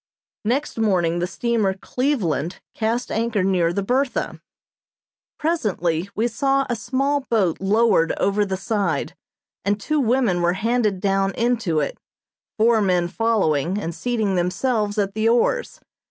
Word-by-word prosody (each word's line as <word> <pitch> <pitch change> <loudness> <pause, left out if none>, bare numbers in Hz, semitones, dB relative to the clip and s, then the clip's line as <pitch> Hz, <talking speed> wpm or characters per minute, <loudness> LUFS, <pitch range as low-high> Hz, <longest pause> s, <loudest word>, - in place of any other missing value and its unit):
Next 255 +2 -1
morning 175 -6 +1
the 175 - -1
steamer 220 -2 0
"Cleveland" 190 - -1
cast 230 +2 -1
anchor 225 -3 0
near 180 -3 +2
the 200 +3 -2
"Bertha." 255 +5 -1 1.0
Presently 195 - -1
we 225 +2 +1
saw 275 +2 +1
a 240 - -1
small 275 +5 0
boat 195 -8 +1
lowered 200 -4 +3
over 200 +1 +1
the 190 -2 -2
side 200 +1 -1 0.5
and 205 +1 0
two 305 +9 0
women 240 -8 +2
were 175 0 +2
handed 215 -1 0
down 195 0 +1
into 230 -10 +1
it, 140 - -4 0.6
four 225 0 +4
men 180 -3 +1
following 190 -6 +1
and 170 -5 -3
seating 220 -1 -1
themselves 205 +4 0
at 200 -1 0
the 220 +2 +1
oars. 245 - +1
210 Hz, 140 wpm, -22 LUFS, 185-235 Hz, 1.0 s, four